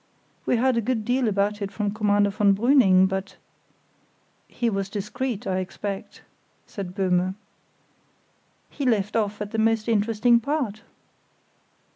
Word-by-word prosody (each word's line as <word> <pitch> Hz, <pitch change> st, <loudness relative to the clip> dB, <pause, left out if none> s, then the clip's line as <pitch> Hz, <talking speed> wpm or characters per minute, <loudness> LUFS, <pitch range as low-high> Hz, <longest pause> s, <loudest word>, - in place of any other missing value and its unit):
We -, -, +3 dB
heard 250 Hz, +1 st, +2 dB
a -, -, +2 dB
good 225 Hz, -1 st, -2 dB
deal 245 Hz, +1 st, +1 dB
about 205 Hz, 0 st, 0 dB
it 200 Hz, -1 st, -3 dB
from 205 Hz, -1 st, -2 dB
Commander 205 Hz, -1 st, +2 dB
von 200 Hz, -1 st, +3 dB
Brüning; 200 Hz, -5 st, +5 dB
but——" 190 Hz, +1 st, -4 dB, 1.1 s
"He 240 Hz, -, -2 dB
was 195 Hz, -3 st, -1 dB
discreet, 215 Hz, +3 st, -4 dB
I 185 Hz, -1 st, -1 dB
expect," 200 Hz, +2 st, -6 dB, 0.4 s
said 185 Hz, -3 st, -7 dB
Böhme. 185 Hz, -1 st, +1 dB, 1.4 s
"He 285 Hz, -, -5 dB
left 210 Hz, -5 st, +1 dB
off 210 Hz, -2 st, 0 dB
at 205 Hz, -, -9 dB
the 225 Hz, -, -2 dB
most 225 Hz, 0 st, +1 dB
interesting 230 Hz, +2 st, +3 dB
part." 235 Hz, -5 st, -2 dB
210 Hz, 135 wpm, -24 LUFS, 195-230 Hz, 1.4 s, Brüning